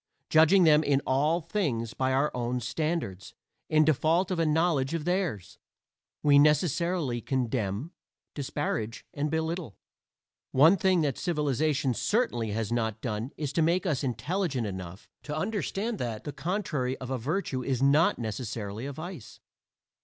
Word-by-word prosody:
Judging 160 +4 +6
them 155 -1 +6
in 140 -2 +2
all 150 +6 +2
things 145 - -2
by 130 0 0
our 135 +3 +2
own 125 0 -1
standards 125 - -3 0.3
in 155 0 +4
default 160 +5 +2
of 180 - -1
a 165 - +2
knowledge 155 -2 +1
of 160 -2 -3
theirs, 175 - -2 0.6
we 145 -1 +6
necessarily 150 -3 +2
condemn, 120 - -2 0.4
disparage 130 -5 -3
and 145 +1 -1
belittle. 160 - -3 0.8
One 155 +8 +7
thing 185 -2 +2
that 140 -5 -1
civilization 150 -4 0
certainly 120 - 0
has 110 +1 -2
not 110 -2 -1
done 110 +1 -3
is 145 -2 -3
to 165 - +2
make 170 +4 +2
us 150 -6 0
intelligent 135 - -1
enough 95 -1 -7
to 150 0 -5
understand 210 +3 -2
that 115 -3 -4
the 145 - -5
contrary 155 -9 -2
of 130 0 -7
a 130 - -1
virtue 140 - -2
is 130 0 -1
not 145 +4 +4
necessarily 110 0 -4
a - - -4
vice. 160 - -9
145 Hz, 145 wpm, -28 LUFS, 120-165 Hz, 0.8 s, One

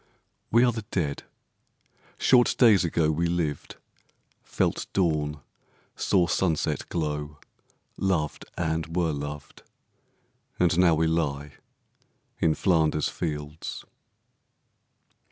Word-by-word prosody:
We 115 +2 +4
are 120 - +3
the 115 -1 -5
Dead. 75 -6 -2 1.0
Short 125 -2 +4
days 110 -7 +6
ago 80 -2 +1
We 85 +2 0
lived, 85 -4 -2 0.7
felt - - -1
dawn, 75 -5 0 0.5
saw 90 -3 +2
sunset 85 -2 -1
glow, 75 -2 -3 0.6
Loved, 90 -6 -1
and 80 -1 -2
were 85 -3 +1
loved, 75 0 -7 1.0
and 85 -2 +3
now 85 -3 +5
we 80 +1 +1
lie 75 -3 -1 0.9
In 80 -2 +2
Flanders 80 -5 +2
fields. 75 -1 -5
80 Hz, 100 wpm, -26 LUFS, 75-90 Hz, 1.0 s, days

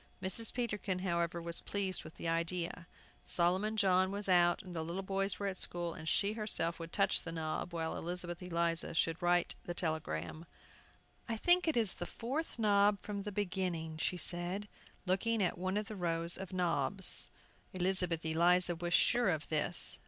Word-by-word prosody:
Mrs. 190 +5 0
Peterkin, 210 -6 -2
however, 170 -1 0
was 170 0 -3
pleased 195 -2 -1
with 155 - -11
the - - -5
idea. 170 +1 -1 0.4
Solomon 190 +5 +1
John 190 -2 +4
was 200 +1 -2
out, 175 -2 +4
and 180 -2 -9
the 160 - -1
little 170 +4 -4
boys 195 +1 -1
were 200 - -3
at 190 -2 -2
school, 175 -1 -1
and 160 - -5
she 205 +1 +2
herself 210 -7 -1
would 165 0 -7
touch 195 -2 +2
the 165 - -6
knob, 160 +1 -3
while 165 -1 -2
Elizabeth 175 0 -1
Eliza 170 -2 -1
should 165 +2 +1
write 175 0 +3
the 175 - -4
telegram. 155 - -2 0.8
"I 225 - -1
think 350 +8 +4
it 315 - +2
is 220 -5 +2
the 175 - -5
fourth 270 +7 -4
knob 205 -2 +4
from 205 -1 -4
the 210 +1 -5
beginning," 180 -5 -2
she 180 - 0
said, 180 +4 -1 0.4
looking 205 +5 +1
at 175 - +1
one 185 +2 -1
of 210 - -1
the 215 - -6
rows 170 -2 -1
of 190 0 -6
knobs. 180 -1 0 0.4
Elizabeth 180 -3 0
Eliza 175 +2 +4
was 175 +1 0
sure 240 -3 +4
of 155 -4 -1
this. 155 -1 +1
180 Hz, 175 wpm, -34 LUFS, 170-200 Hz, 0.8 s, John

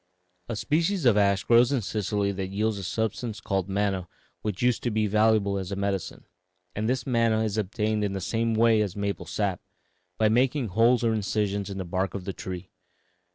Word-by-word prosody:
"A 115 - -2
species 160 - 0
of 120 -4 +6
ash 100 -1 +3
grows 120 +1 +5
in 135 -4 +1
Sicily 100 0 -1
that 95 -1 -4
yields 105 +2 -1
a - - -6
substance 110 +3 -2
called 95 -3 -2
manna 95 -2 -1 0.3
which 105 0 -3
used 125 -2 +2
to 120 - -1
be 110 -1 +1
valuable 105 -1 +2
as 95 0 -6
a - - -1
medicine, 100 -2 -3 0.5
and 110 +2 -1
this 125 -1 -1
manna 115 -3 +2
is 110 -2 -1
obtained 105 +1 -1
in 100 -1 -1
the 95 - -2
same 115 +3 -1
way 115 -1 +4
as 100 -4 -2
maple 100 -1 -3
sap 100 -4 -1 0.6
by 110 - +3
making 125 +2 +2
holes 115 +5 +3
or 115 -1 +2
incisions 100 -1 -1
in 100 - -5
the 95 - -4
bark 95 +2 -2
of 95 -2 -5
the 95 - -3
tree. 90 0 -7
105 Hz, 200 wpm, -26 LUFS, 100-115 Hz, 0.6 s, of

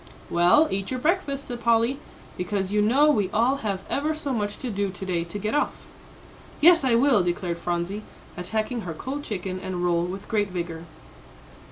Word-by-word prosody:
"Well, 175 - +5
eat 195 0 -2
your 255 - -2
breakfast," 290 -3 0
said 240 -1 -6
Polly, 235 +3 +2 0.4
"because 190 +1 -2
you 210 0 +2
know 275 +8 +5
we 205 -9 +1
all 240 +7 +2
have 200 -6 -3
ever 305 +3 0
so 290 -3 -3
much 205 -3 -2
to 250 - -4
do 200 -1 -1
to 190 +1 -7
day 175 -3 -1
to 170 +4 -6
get 210 +2 -2
off." 295 - -1 0.7
"Yes, 335 0 +7
I 255 -3 +3
will," 245 -3 +4
declared 175 -1 -2
Phronsie, 175 +4 -2 0.3
attacking 220 +6 -2
her 170 -5 -5
cold 280 - -5
chicken 185 -4 -4
and 180 -1 -3
roll 170 -1 +2
with 190 +3 -6
great 205 -3 0
vigour. 170 -2 -5
210 Hz, 185 wpm, -25 LUFS, 180-260 Hz, 0.7 s, Yes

